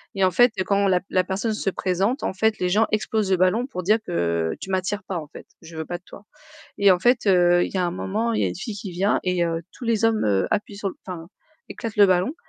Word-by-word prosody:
Et 195 - +1
en 185 - +4
fait 245 +2 +5
quand 200 0 +2
la 180 -1 +3
la 185 -1 +3
personne 200 +4 -2
se 205 - -1
présente, 195 - -1
en - - -1
fait, 220 +3 +1
les 180 - 0
gens 215 +4 +3
explosent 215 -1 0
le 190 - +3
ballon 205 +8 +2
pour 185 -9 -6
dire 215 +5 +3
que: 85 -1 -1
«Tu 190 - -7
m'attires 190 +3 -1
pas 185 - -4
en 150 - -9
fait, - - -12 0.2
je 165 0 -12
veux 160 - -4
pas 175 0 -5
de - - -43
toi» 205 - -14 0.5
et 200 -1 +5
en 180 - +4
fait, 240 +1 +2
heu, 175 -2 +4
il - - -6
y - - 0
un 175 -1 +1
moment, 215 +6 -2
il - - 0
y - - +2
a - - +1
une - - -5
fille 205 +3 -6
qui 195 -1 -7
vient 190 +4 +1
et 180 -2 0
heu, 165 0 -2
tous 245 - -10
les 225 -1 +1
hommes, 225 -1 +2
heu, 95 -2 +2
appuient 205 -1 -2
sur 200 -1 -3 0.2
enfin, 170 -2 -7 0.4
éclatent 225 -2 -6
le 205 - +7
ballon 185 - +1
190 Hz, 270 wpm, -23 LUFS, 180-215 Hz, 0.5 s, le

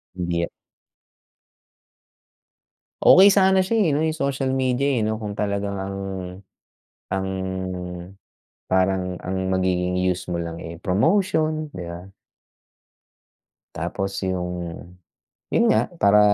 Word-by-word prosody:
Hindi. 85 -1 -1 2.5
Okey 195 +2 +8
sana 190 -1 +5
siya 195 +5 0
eh 205 -7 +3
'no, 145 - +1
yung 160 0 0
social 140 -2 -1
media 130 +1 +1
eh, 120 -6 +1
'no, 110 +1 -2
kung 105 -1 -5
talagang 100 -1 -1
ang 95 0 -4 1.1
ang 95 0 -1 1.4
parang 95 -1 +1
ang 95 0 -2
magiging 90 -1 +1
use 90 0 -1
mo 85 - -1
lang 85 0 -5
eh 80 0 -8
promotion, 155 - +1
di 90 - -5
ba? 85 +3 -9 1.6
Tapos 95 0 -3
yung, 90 -2 -4 0.6
yun 235 - +3
nga, - - +2
para 100 +1 +6
95 Hz, 110 wpm, -23 LUFS, 90-140 Hz, 2.5 s, Okey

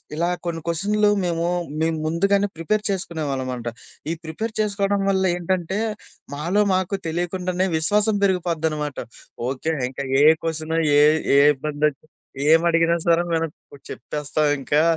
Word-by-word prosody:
ఇలా 170 +2 0 0.2
కొన్ని 165 -1 -3
క్వెషన్లు 205 +5 +2
మేము 170 -1 -1 0.4
మేము 160 0 +1
ముందుగానే 200 +5 +2
ప్రిపేర్ 165 +6 -1
చేసుకునేవాళ్ళంమాట. 140 -10 -3 0.4
ఈ - - 0
ప్రిపేర్ 165 +8 -4
చేసుకోవడం 200 -1 0
వల్ల 190 -1 +2
ఏంటంటే, 180 +1 -2 0.6
మాలో 170 +8 0
మాకు 185 +1 0
తెలియకుండానే 180 +2 -1
విశ్వాసం 205 +7 +2
పెరిగిపోద్దనమాట. 160 -6 -1 0.5
ఓకే, 135 +5 -2 0.2
ఇంకా 135 +1 -6 0.2
ఏ - - +6 0.2
క్వెషను 160 0 -2 0.2
ఏ - - +7 0.4
ఏ - - +7 0.2
ఇబ్బంది 145 +2 -2
ఒచ్చిన, 150 +2 -19 0.4
ఏమి 165 +1 +5
అడిగినా 165 0 +3
సరే, 170 0 +4
మనం 165 -1 0 0.4
చెప్పేస్తాం 150 0 -2
ఇంకా, 145 +3 +2
165 Hz, 130 wpm, -22 LUFS, 155-190 Hz, 0.6 s, ఏ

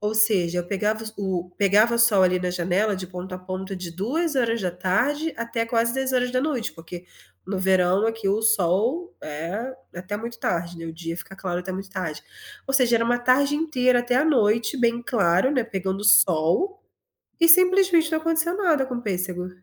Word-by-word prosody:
Ou 210 +1 -2
seja, 195 -5 +2
eu 175 - -8
pegava 215 +3 -2
o 185 -3 -3
pegava 210 +4 +3
o - - -3
sol 215 -5 +4
ali 180 0 +3
na 180 0 -2
janela 180 +4 0
de 185 -1 -6
ponto 180 +1 -8
a - - -6
ponto 185 +1 -6
de 180 -2 -7
14h 240 - -1
da 180 - -1
tarde 245 - -1
até 230 0 -3
quase 235 0 0
22h 265 0 -2
horas 250 -1 +1
da 255 0 0
noite 265 -6 -2
porque, 170 +2 -10 0.4
no 195 0 -3
verão 190 +2 +2
aqui 225 -2 -3
o 205 +3 +1
sol 220 - +1
é 175 - -5 0.2
até 185 +4 -5
muito 235 +2 -7
tarde, 170 0 -3
né, 165 - -7
o 165 - -6
dia 165 0 -6
fica 195 +1 -9
claro 180 -2 -3
até 185 +1 -6
muito 190 +1 -7
tarde. 180 -6 -5 0.4
Ou 270 - -3
seja, 245 -3 +3
era 230 - +1
uma 245 +1 +1
tarde 270 +4 +2
inteira 255 -6 +1
até 245 0 -1
a 285 - +3
noite 230 -4 +2
bem 235 0 +1
claro, 200 -1 +2
né, 260 -5 0
pegando 195 -3 -4
o 205 - -6
sol, 200 - +3 0.6
e 335 - +5
simplesmente 365 -2 +5
não 315 - +1
aconteceu 330 +2 0
nada 330 -9 +1
com 255 - -5
o 240 - -4
pêssego. 185 -3 -3
215 Hz, 200 wpm, -23 LUFS, 185-255 Hz, 0.6 s, e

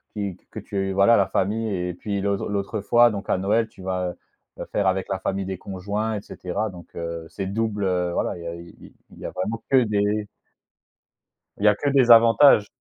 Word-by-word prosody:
qui 100 -3 -3
q - - -36
que - - -12
tu 95 -1 -3
voilà, 100 +5 +5
la 100 - +3
famille 110 +4 -1
et 90 -1 -2
puis, 100 +3 -4
l'autre 100 0 -1
l'autre 100 +1 -2
fois, 120 +3 +5
donc 100 -1 -6
à - - +2
Noël, 105 +4 +1
tu 95 - -15
vas, 90 -1 -2
heu, 90 - -9 0.5
heu, - - -8
faire 100 -2 +1
avec 95 0 0
la 95 -1 -2
famille 95 0 -2
des 95 -1 -5
conjoints 100 +4 -3
et 100 - -4
cetera. 95 +2 -4
Donc 85 -2 -12
heu, 85 -1 -5
c'est 95 - -5
double, 105 +1 -2
heu, 90 -2 0
voilà, - - -1
il - - -9
y - - -6
a 85 - -5
i 85 0 -11
i - - -14 0.2
il - - -15
y - - -8
a - - -3
vraiment 110 +5 -4
que 130 -2 +5
des 105 -1 0 1.3
il 100 - -2
y - - +7
a 105 - +5
que 145 - -1
des 135 -3 +3
avantages. 115 0 +7
100 Hz, 235 wpm, -23 LUFS, 95-110 Hz, 1.3 s, y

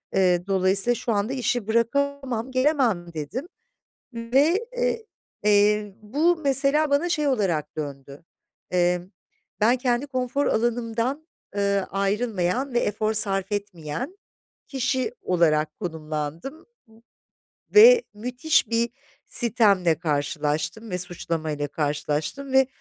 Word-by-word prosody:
Eee, 180 -2 +3
dolayısıyla 195 +4 +2
şu 235 - -3
anda 205 +5 -1
işi 245 -4 -1
bırakamam, 260 +1 -1
gelemem." 255 - +1
dedim 160 - -5 0.7
ve, 280 - +1 0.8
eee, 210 0 +3
bu 300 +11 +1
mesela 285 0 +2
bana 285 +5 +2
şey 300 -4 0
olarak 185 - -1
döndü: 140 0 -7 0.5
Eee, 180 0 +2 0.6
ben 230 +4 +4
kendi 250 +1 0
konfor 265 +1 -1
alanımdan, 240 +5 -1 0.3
ııı, 200 -1 +1
ayrılmayan 205 +4 -1
ve 240 - +3
efor 215 0 -1
sarf 195 -2 +1
etmeyen 205 - -5 0.5
kişi 260 - -1
olarak 155 -4 +1
konumlandım 160 - -5 1.1
ve 465 +3 +9
müthiş 250 +7 0
bir 235 0 +1 0.4
sitemle 200 -8 +3
karşılaştım 155 +5 -2
ve 180 - -1
suçlama 165 -3 -2
ile 145 -1 -3
karşılaştım. 150 - -3
Ve 265 -1 +5
215 Hz, 105 wpm, -24 LUFS, 175-260 Hz, 1.1 s, ve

